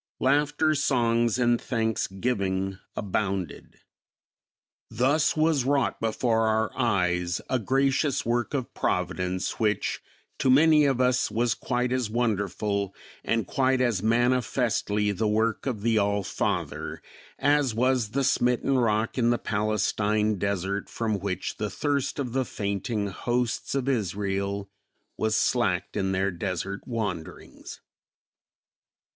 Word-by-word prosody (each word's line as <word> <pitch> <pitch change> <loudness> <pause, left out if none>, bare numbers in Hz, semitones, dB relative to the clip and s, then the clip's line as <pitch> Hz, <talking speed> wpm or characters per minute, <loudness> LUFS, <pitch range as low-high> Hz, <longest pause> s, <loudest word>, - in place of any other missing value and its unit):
Laughter, 150 +3 +2
songs 120 -5 +2
and 120 -1 +2
thanksgiving 95 -4 -1 0.2
abounded. 95 -2 -3 1.1
Thus 140 +8 +2
was 155 -3 +3
wrought 140 +1 0
before 115 0 +1
our 110 0 0
eyes 90 -7 +1
a 130 - +2
gracious 135 +4 +1
work 120 +4 0
of 130 -3 -3
Providence 90 +1 -2
which 105 -1 0 0.4
to 130 - +2
many 150 +3 +6
of 135 -3 +1
us 125 0 +2
was 115 0 +1
quite 125 0 -2
as 125 -4 0
wonderful 105 -3 -1 0.3
and 115 -1 0
quite 130 -1 +1
as 120 -7 +1
manifestly 115 -2 +1
the 105 +2 -1
work 110 +4 0
of 110 -6 -3
the 115 -1 +3
All 100 0 +1
Father - - -3 0.4
as 145 -5 +2
was 125 -2 +1
the 135 +5 -1
smitten 125 +1 +2
rock 110 +1 +1
in 120 -1 +3
the 120 - +3
Palestine 105 0 0
desert 100 0 -2
from 110 -3 -2
which 95 -1 -3
the 105 - -2
thirst 140 +5 -1
of 130 -5 -3
the 130 0 +1
fainting 100 0 -2
hosts 120 +6 -2
of 135 -1 -1
Israel 100 -3 -1 0.5
was 110 0 0
slacked - - +1
in 95 0 0
their 95 +1 0
desert 95 +2 -4
wanderings. 105 -9 -5
115 Hz, 125 wpm, -26 LUFS, 100-125 Hz, 1.1 s, many